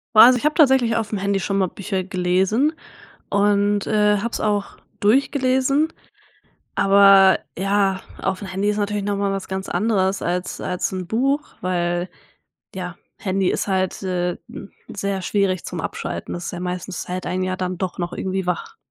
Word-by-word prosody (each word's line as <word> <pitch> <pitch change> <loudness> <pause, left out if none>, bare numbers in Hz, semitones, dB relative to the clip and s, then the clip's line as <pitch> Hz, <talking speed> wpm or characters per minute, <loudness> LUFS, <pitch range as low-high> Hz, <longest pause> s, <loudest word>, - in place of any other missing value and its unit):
Boah, 215 - +11
also 250 +1 +7
ich - - -6
habe 300 +1 +2
tatsächlich 265 -7 +4
auf 225 -2 -2
dem 210 - -2
Handy 200 0 0
schon 195 +1 -1
mal 190 -1 +2
Bücher 190 0 -3
gelesen 190 - +1 0.6
und, 205 0 +2
äh, 210 -1 +3
habe 235 +4 -2
es - - -4
auch 205 -1 -1 0.2
durchgelesen. 265 +5 +2 0.8
Aber 195 -1 +6 0.2
ja, 195 0 +1 0.2
auf 190 - -1
dem 200 - -7
Handy 195 +2 0
ist 210 - -2
natürlich 205 -1 -1
noch 205 0 -1
mal 200 0 0
was 195 -1 -3
ganz 190 0 -4
anderes 190 -1 +1
als 180 +1 -2
als 180 0 -2
'n 185 -2 -4
Buch, 275 +8 0
weil, 175 0 -1 0.7
ja, 180 -2 -5 0.2
Handy 190 -1 0
ist - - -1
halt, 190 -1 -1
äh, 180 -2 -1
hm, 195 - -10 0.2
sehr 200 -1 -2
schwierig 185 -1 0
zum - - -4
Abschalten. - - -5
Das 175 0 -5
ist - - -4
ja 175 - -5
meistens 180 0 -4
es - - -7
hält 180 +1 -4
einen 185 0 -1
ja 185 0 -2
dann 185 0 -3
doch 185 +1 -4
noch 175 -1 -3
irgendwie 190 0 -3
wach. 180 -1 -3
195 Hz, 185 wpm, -21 LUFS, 185-210 Hz, 0.8 s, Boah